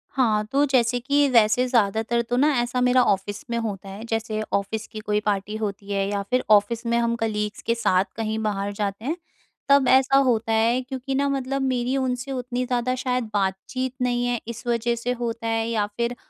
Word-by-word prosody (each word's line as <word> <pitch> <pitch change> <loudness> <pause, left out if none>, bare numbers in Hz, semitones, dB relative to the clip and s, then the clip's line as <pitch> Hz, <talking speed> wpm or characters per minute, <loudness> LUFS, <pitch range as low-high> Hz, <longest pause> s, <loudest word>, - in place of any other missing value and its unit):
हाँ, 220 -5 +2
तो 285 +2 +3
जैसे 245 -2 +2
कि 285 +3 +2
वैसे 230 +1 +4
ज़्यादातर 225 0 +1
तो 245 - +1
ना 295 +3 +4
ऐसा 245 +1 -1
मेरा 250 0 +4
ऑफ़िस 200 0 -1
में 235 - -1
होता 200 -4 -4
है, 200 +3 -8
जैसे 225 -1 -2
ऑफ़िस 205 +2 -1
की 215 - -6
कोई 210 -1 0
पार्टी 205 +1 -1
होती 205 -1 -5
है 195 0 0
या 200 -1 -1
फिर 255 0 +1
ऑफ़िस 215 +3 +3
में 235 0 +1
हम 235 0 +1
कलीग्स 210 -1 -2
के 230 - +2
साथ 190 -4 +2
कहीं 220 -1 -2
बाहर 205 -1 -1
जाते 205 +2 -3
हैं, 315 +4 0 0.5
तब 280 -2 +5
ऐसा 265 +1 +5
होता 230 -4 +2
है। 230 +3 +2
क्योंकि 265 +1 -5
ना 280 +1 +1
मतलब 275 0 -2
मेरी 255 0 0
उनसे 260 +1 -2
उतनी 250 -1 -2
ज़्यादा 250 0 0
शायद 250 -3 -2
बातचीत 205 +7 -2
नहीं 245 -1 +1
है 245 -2 0
इस 235 +1 -7
वजह 235 0 +1
से 235 +2 -3
होता 230 -1 -3
है 225 0 0
या 215 -3 0
फिर 235 +1 -1
235 Hz, 205 wpm, -24 LUFS, 215-255 Hz, 0.5 s, तब